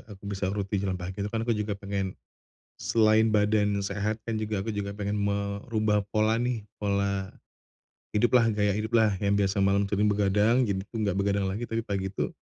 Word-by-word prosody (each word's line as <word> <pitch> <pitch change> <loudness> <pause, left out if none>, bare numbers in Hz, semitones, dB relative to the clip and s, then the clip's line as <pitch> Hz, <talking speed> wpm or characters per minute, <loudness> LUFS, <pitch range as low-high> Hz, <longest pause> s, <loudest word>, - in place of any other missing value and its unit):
aku 100 -1 -12
bisa 100 -1 -2
rutin 100 0 -2
jalan 95 -2 -1
pagi 95 +3 -6
itu 100 - -1
kan 115 +1 -2
aku 120 - +1
juga 105 -1 -2
pengen 100 -1 -3 0.6
selain 110 0 +4
badan 105 -1 +2
yang 100 - -2
sehat, 100 +2 -1
kan 110 -2 -2
juga 105 -2 -2
aku 115 - -2
juga 100 -1 -4
pengen 105 0 -2
merubah 100 +1 0
pola 110 +2 +2
nih. 120 -3 -1 0.2
Pola 100 -1 0 0.9
hiduplah, 120 +2 +4
gaya 105 -1 +2
hiduplah 110 +1 +2
yang 100 0 +1
biasa 100 0 +1
malam 100 +1 +3
sering 105 +1 +1
begadang 105 +4 +3
jadi 100 -4 0
tuh 115 - -7
nggak 100 -3 0
begadang 100 0 +1
lagi. 115 +5 -4
Tapi 115 0 -2
pagi 100 -2 -2
itu 95 - -3
105 Hz, 190 wpm, -27 LUFS, 100-110 Hz, 0.9 s, selain